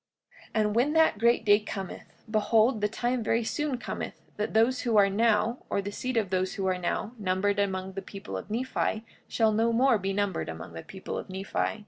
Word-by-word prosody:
45:13 - - -28
And 210 -1 +2
when 260 +6 +3
that 320 -8 +4
great 235 0 +3
day 205 0 +6
cometh, 195 -3 -7 0.2
behold, 220 +2 +3
the 210 - +3
time 240 +3 -1
very 230 +2 +1
soon 290 +3 -1
cometh 240 - -5 0.2
that 210 +1 -2
those 235 +4 +3
who 230 -3 +1
are 200 -1 +5
now, 225 +3 +2
or - - 0
the 200 +1 -3
seed 255 +3 -3
of 205 -4 0
those 185 0 0
who 195 - -2
are 185 -1 +1
now 180 +5 -2
numbered 200 +1 +1
among 190 -1 -1
the 195 - -4
people 195 - -8
of 95 - -6
Nephi, 230 -1 -1 0.2
shall 225 -2 +2
no 225 +2 +2
more 240 -1 +4
be 195 +1 -2
numbered 195 - -1
among 80 +1 -7
the 80 - -6
people 190 - -6
of - - -9
Nephi. 195 +3 -2
210 Hz, 210 wpm, -28 LUFS, 195-230 Hz, 0.2 s, day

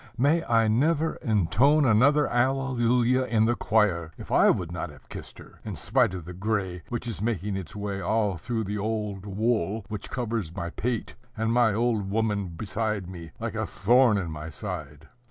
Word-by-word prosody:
may 150 +7 +3
I 115 -1 +3
never 155 +8 +2
intone 115 - +3
another 135 +6 +4
alleluia 125 0 +2
in 110 -1 +3
the 120 +1 +2
choir, 95 -9 +1
if - - -10
I - - +5
would 85 -2 0
not 90 - -4
have - - -16
kissed - - -9
her, - - -14
in - - -5
spite 95 - +1
of 90 -4 -7
the 90 - -7
gray 95 -2 -2
which 120 0 -4
is 110 -5 -4
making 105 -3 -1
its 95 -2 -6
way 100 -1 -3
all 105 +1 +1
through 115 +6 -2
the 105 +1 -3
old 105 -2 -3
wool 105 0 0
which 105 -2 -6
covers 115 -8 -3
my 85 -3 -4
pate, 120 +2 -3 0.2
and 115 +1 0
my 120 -2 +4
old 110 -4 0
woman 105 -2 0
beside 100 +3 -3
me, 85 -3 -8
like - - -3
a - - -2
thorn 120 +3 +4
in 90 -5 -3
my 80 0 -6
side! 75 -4 -7
110 Hz, 185 wpm, -26 LUFS, 95-120 Hz, 0.2 s, I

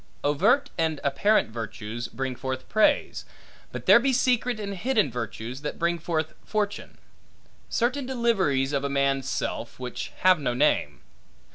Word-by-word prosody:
Overt 200 - +2
and 160 -2 0
apparent 140 - +2
virtues, 115 +1 -5
bring 130 -1 -4
forth 130 0 -5
praise; 215 - +2 0.5
but - - -7
there - - +8
be 270 +3 +1
secret 250 -2 +1
and 200 -1 -4
hidden 215 - +1
virtues, 120 +2 -5
that 150 - -4
bring 170 0 0
forth 160 -1 -2
fortune; 210 -1 -3 0.7
certain 250 +3 0
deliveries 190 - +1
of 140 -1 0
a 140 - -1
man's 140 -1 0
self, - - -3
which 125 -1 -5
have 185 -2 +5
no 125 -4 -1
name. 150 +4 +1
155 Hz, 145 wpm, -26 LUFS, 135-215 Hz, 0.7 s, there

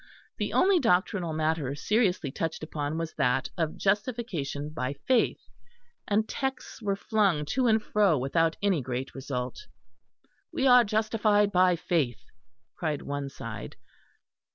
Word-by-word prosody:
The - - -1
only 375 0 +4
doctrinal 185 - +1
matter 155 -3 -1
seriously 180 - +1
touched 160 +2 -3
upon 150 -1 -3
was 165 -1 -3
that 125 -1 +1
of 160 -2 -2
Justification 195 - -1
by 135 -3 -3
Faith; 235 - +1 0.7
and 215 +1 +1
texts 265 -2 -4
were 200 -2 0
flung 195 -7 +1
to 255 -1 +2
and 220 -1 +3
fro 205 -8 +3
without 160 +5 +1
any 190 -7 +2
great 130 +1 -4
result. 130 -2 -5 0.8
"We 265 - -1
are 250 -2 +7
justified 215 -1 +2
by 180 -1 +4
faith," 145 -10 -1 0.5
cried 155 -4 -2
one 140 -1 -4
side. - - -8
170 Hz, 130 wpm, -28 LUFS, 145-215 Hz, 0.8 s, are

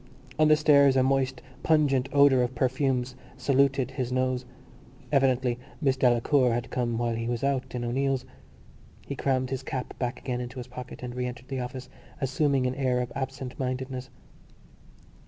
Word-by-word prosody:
On 155 - +6
the 155 - +7
stairs 140 -3 +5
a 130 - +4
moist 130 -1 0 0.2
pungent 140 -4 +2
odour 140 -2 +5
of 125 +1 -1
perfumes 130 0 0 0.2
saluted 135 0 +2
his 130 -2 -3
nose: 130 0 0 0.7
evidently 130 -3 +2 0.2
Miss 135 -4 +2
Delacour 125 0 +3
had 120 +1 -3
come 120 -2 -1
while 120 0 0
he 115 0 -3
was 120 +1 -2
out 135 -2 -1
in 120 - -2
O'Neill's. 135 +2 0 0.8
He 140 - -5
crammed 130 -1 0
his 135 - -2
cap 130 -1 -4
back 125 0 -2
again 125 -2 -3
into 125 +1 -7
his 125 - -5
pocket 125 0 -9
and 125 -1 -5
re 125 0 -2
entered 125 +1 -9
the 135 -1 -3
office, 125 +1 -5 0.3
assuming 135 -1 +1
an 125 - 0
air 130 -2 0
of 125 -1 -3
absent 135 -1 -5
mindedness. 130 0 -3
130 Hz, 170 wpm, -27 LUFS, 125-135 Hz, 0.8 s, the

